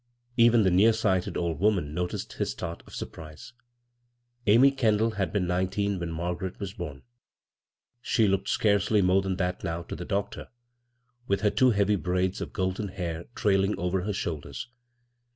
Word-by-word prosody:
Ev«b 115 -1 +6
the 95 - +3
near 105 +6 +5
sighted 95 -5 0
old 85 -3 -2
woman 95 -7 +1
noticed 90 +2 -3
his - - -2
start 85 0 -5
of - - -11
surprise. 75 +7 -9 0.9
Amy 120 +7 +7
Kendall 115 -4 +2
had 95 -6 -2
been 100 -3 0
nineteen 95 +2 0
when 85 -1 -4
Margaret 90 +3 -4
was 100 -1 -5
bom; 75 -8 -7 1.0
she 115 -3 +2
looked 95 0 0
scarcely 100 -1 +2
more 90 +2 +4
than 95 -1 -2
that 90 -1 -2
now 85 +1 -3
to - - -7
the 90 - -6
doctor, 100 +2 -3 0.8
with 100 0 +1
her 105 - +3
two 130 - +4
heavy 100 -2 +2
braids 90 0 -1
of - - -5
golden 95 +2 -2
hair 85 -3 -5
trailing 100 -2 +2
over 90 +1 -1
her 105 +3 -2
shoulders. 85 +7 -5
95 Hz, 165 wpm, -27 LUFS, 90-105 Hz, 1.0 s, Amy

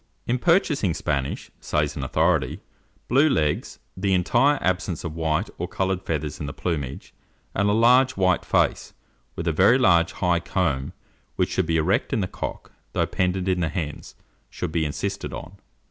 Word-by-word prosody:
"In 125 +1 0
purchasing 150 - +2
Spanish," 70 -2 -2
says 75 -1 -1
an 70 - -4
authority, 80 0 +1 0.5
"blue 140 +5 +4
legs, 75 - 0 0.2
the 95 0 +1
entire 125 +11 +3
absence 95 -2 -1
of 85 -3 -4
white 80 +4 0
or 90 - -2
coloured 95 0 -1
feathers 75 -5 -3
in 75 - -4
the 70 - -5
plumage, 70 -4 -4 0.4
and 100 +1 +1
a - - +3
large, 125 +4 +5
white 95 -2 +2
face, - - 0 0.4
with 85 - -4
a - - +3
very 95 +10 +5
large 85 -10 +4
high 90 -1 +1
comb, 80 -8 -1 0.4
which - - 0
should 95 -3 0
be 80 0 +2
erect 95 - +1
in - - +1
the 95 - 0
cock, - - -6 0.2
though - - +1
pendent 90 0 -1
in 90 -1 +1
the 85 -2 0
hens, 75 -2 -5 0.3
should 90 - -4
be 80 -1 0
insisted 75 - -3
on." - - -8
90 Hz, 175 wpm, -24 LUFS, 80-100 Hz, 0.5 s, large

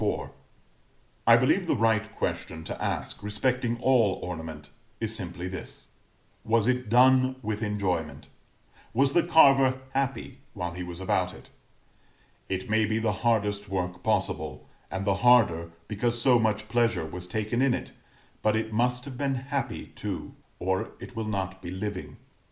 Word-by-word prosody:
I - - +9
believe - - +2
the - - +2
right 110 -1 +1
question 80 0 -3
to - - -6
ask, - - -3
respecting 120 +3 0
all 120 -8 +4
ornament, 80 -4 -6 0.3
is - - -2
simply 90 +3 -4
this: 95 0 -7 0.5
Was 115 0 +2
it 125 -3 0
done 130 +2 +5
with 105 0 -2
enjoyment 90 -9 -2 0.7
was 135 +2 +3
the 175 - +5
carver 135 -6 +5
happy 135 -1 -2 0.2
while 90 -3 -3
he 90 - -6
was 90 0 -6
about 95 - 0
it? - - -16 1.0
It 95 0 -2
may 110 +1 +3
be 110 +1 0
the 110 -2 +1
hardest 105 -3 +1
work 90 -1 -2
possible, - - -1 0.2
and 95 +1 -3
the 100 -2 +2
harder 100 -10 +5 0.2
because 115 +3 0
so 125 0 +5
much 110 -1 0
pleasure 115 -6 +1
was 90 +3 -7
taken 110 +5 -1
in 135 -2 +4
it; - - -6 0.5
but 110 0 +2
it 110 0 -2
must 125 +2 +1
have 130 -3 -8
been 140 -1 0
happy 135 +2 -4
too, - - -5 0.2
or 95 +1 -1
it 125 - -10
will 110 -1 -3
not 95 -2 -3
be 85 - -6
living. 95 +1 -5
110 Hz, 155 wpm, -27 LUFS, 95-125 Hz, 1.0 s, I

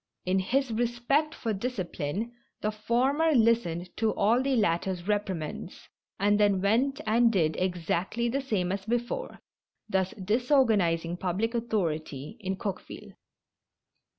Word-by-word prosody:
In 185 +1 +2
his 255 +7 0
respect 240 +7 0
for 225 -2 -2
disci 200 -4 -3
pline, 185 +10 -3 0.3
the 215 - 0
former 260 +9 +1
listened 220 - +2
to 225 -1 +2
all 230 +5 +3
the 270 0 +1
latter's 185 -3 0
reprimands, 190 -5 -3 0.3
and 205 +1 +3
then 205 -2 +4
went 235 +8 +2
and 230 +2 +4
did 160 -7 +1
exactly 180 +5 -1
the 270 +4 0
same 200 -9 -1
as 195 0 -3
before, 240 - -3 0.5
thus 190 -3 +1
disorganizing 205 - +2
public 190 +6 -1
authority 160 - -2
in 190 -2 -2
Coqueville. 190 -1 -6
210 Hz, 125 wpm, -28 LUFS, 185-240 Hz, 0.5 s, then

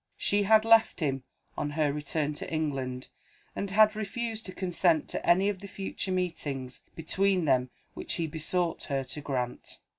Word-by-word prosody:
She 205 0 +2
had 215 +2 +5
left 225 -2 +5
him, 135 -5 0 0.3
on 145 - -2
her 150 -2 +2
return 150 0 -1
to 150 - -6
England, 135 -5 -2 0.5
and 200 - -3
had 215 +2 +5
refused 220 +1 -4
to - - -5
consent 180 -3 +1
to - - -3
any 185 +3 +4
of 205 -2 -1
the 200 - -9
future 195 0 -4
meetings 145 -8 -3
between 185 +2 +1
them 130 -3 +2 0.2
which - - -3
he 165 - -1
besought 165 +2 -1
her 135 -2 -1
to 135 +3 -7
grant. 125 -4 -4
170 Hz, 170 wpm, -29 LUFS, 145-200 Hz, 0.5 s, had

